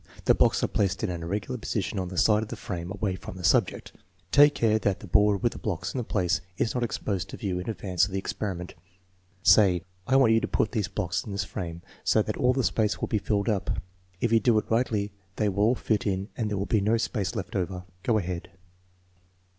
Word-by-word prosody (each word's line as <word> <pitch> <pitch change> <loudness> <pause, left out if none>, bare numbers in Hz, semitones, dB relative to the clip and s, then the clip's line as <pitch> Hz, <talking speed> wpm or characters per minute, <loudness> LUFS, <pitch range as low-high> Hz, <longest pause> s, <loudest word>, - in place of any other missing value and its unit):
The - - +6
blocks - - +3
are - - +3
placed 100 +1 0
in 105 - 0
an 85 -1 -5
irregular 105 +9 -3
position 105 -2 -2
on 90 - -2
the 90 0 -7
side 105 +2 +4
of 110 - -6
the - - -4
frame 85 -2 -5
away 100 0 -2
from 90 0 -9
the 90 - -8
subject. 80 - +2 0.4
Take 145 +1 +7
care 110 -1 +2
that 100 -1 0
the - - -10
board 105 +1 +3
with 120 - +3
the - - -9
blocks 90 -2 -3
in 125 - -2
place 90 -5 0 0.2
is 115 - 0
not 125 - -1
exposed 100 -6 -2
to - - -7
view 95 -3 -2
in 90 - -5
advance 95 -5 +1
of - - -10
the 95 - -2
experiment. 95 -2 -4 0.7
Say: 95 -3 +5 0.2
I 130 - +3
want 130 -4 +6
you 115 - +5
to - - -1
put 110 - 0
these 105 -6 -1
blocks 90 +2 -2
in 105 - -8
this 100 - -1
frame 85 -1 -6 0.2
so 110 - +3
that 110 - -2
dl 125 +3 +2
the 130 - +1
space 110 -2 +1
will - - -2
be 110 - +1
filled 100 +1 -1
up. 105 -4 0 0.4
If 120 - 0
you 115 - +5
do 115 -1 +3
it 105 - -2
rigidly 110 -3 +1 0.2
they 105 -2 +1
ynll 100 - -5
all 110 +5 +4
fit 110 -3 -1
in 95 +1 -1
and 110 -3 -2
there 105 - -2
will 100 - -1
be 110 -1 +1
no 110 +3 +2
space 110 -2 -2
left 105 -1 -5
over. 90 -1 -2 0.2
Go 115 +1 +2
ahead." 90 -3 -4
105 Hz, 240 wpm, -27 LUFS, 95-110 Hz, 0.7 s, Take